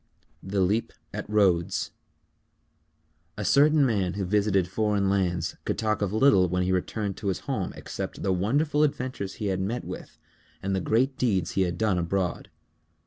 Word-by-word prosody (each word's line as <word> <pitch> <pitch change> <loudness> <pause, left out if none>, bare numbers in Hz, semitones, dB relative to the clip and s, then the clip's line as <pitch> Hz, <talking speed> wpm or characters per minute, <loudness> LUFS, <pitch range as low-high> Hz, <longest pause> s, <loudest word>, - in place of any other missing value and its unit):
_ - - -44 0.5
THE 100 0 +1
LEAP 105 +5 +1 0.2
AT - - -5
RHODES 95 -5 +2 1.5
A 105 - -3
certain 145 +3 +5
man 100 -7 0
who 100 -1 -2
visited 100 -1 +2
foreign 100 0 +1
lands 90 -4 0
could - - -2
talk 110 -1 0
of 100 -2 0
little 110 -5 +4
when 90 +1 0
he 90 - 0
returned 95 +2 -2
to 105 - -5
his 95 - -1
home - - -2
except - - -6
the 95 - +2
wonderful 145 - +1
adventures 130 -9 -1
he 105 - -2
had 95 - -2
met 115 +6 -2
with - - -8 0.5
and 95 0 0
the 95 - 0
great 130 +8 +1
deeds 100 -8 +1
he 95 - 0
had 90 -2 0
done 100 -4 +1
abroad. 90 +1 -2
100 Hz, 175 wpm, -27 LUFS, 95-110 Hz, 1.5 s, certain